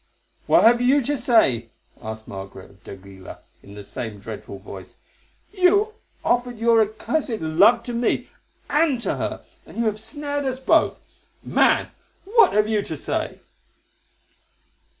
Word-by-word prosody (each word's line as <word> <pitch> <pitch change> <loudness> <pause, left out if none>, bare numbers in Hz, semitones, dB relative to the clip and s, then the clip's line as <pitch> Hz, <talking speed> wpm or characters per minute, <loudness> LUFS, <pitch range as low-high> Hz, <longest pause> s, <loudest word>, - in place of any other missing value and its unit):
"What - - +5
have 240 +2 +5
you 270 +3 +3
to 290 +5 -1
say?" 135 - +2 0.3
asked 110 0 -8
Margaret 95 -1 -9
of 95 - -24
d'Aguilar 95 -1 -11 0.2
in 100 0 -14
the 105 - -9
same 105 +1 -6
dreadful 105 -1 -8
voice. 95 -1 -11 0.6
"You 405 +3 +3 0.3
offered 245 0 0
your 230 0 +4
accursed 220 +3 -2
love 195 +10 +4
to 245 - -5
me—and 275 +4 -1
to - - -2
her, - - -4 0.2
and - - -14
you 235 - 0
have 215 -1 -1
snared 285 +5 -4
us 260 -1 -2
both. 265 - +2 0.4
Man, - - +2 0.3
what 435 0 +4
have 210 0 +3
you 215 -1 +1
to 160 -6 -6
say?" - - -4
225 Hz, 140 wpm, -22 LUFS, -, 0.6 s, What